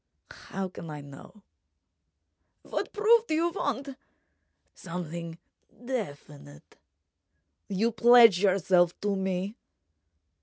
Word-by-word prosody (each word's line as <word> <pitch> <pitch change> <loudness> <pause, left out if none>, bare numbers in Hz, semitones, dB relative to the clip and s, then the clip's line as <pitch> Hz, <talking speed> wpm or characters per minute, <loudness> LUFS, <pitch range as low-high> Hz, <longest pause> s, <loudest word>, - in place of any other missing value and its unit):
How 195 0 -6
can 170 -2 -10
I 150 -1 -7
know—?" 145 +8 -14 1.2
"What - - -4
proof 450 +2 +3
do 310 - 0
you 335 +2 +1
want?" 280 - -3 0.8
"Something 170 -1 -7 0.5
definite.... 145 - -7 0.9
You 210 +4 0
pledge 230 -4 +6
yourself 185 -3 +2
to 205 -1 0
me?" 190 +3 -3
195 Hz, 90 wpm, -28 LUFS, 170-240 Hz, 1.2 s, pledge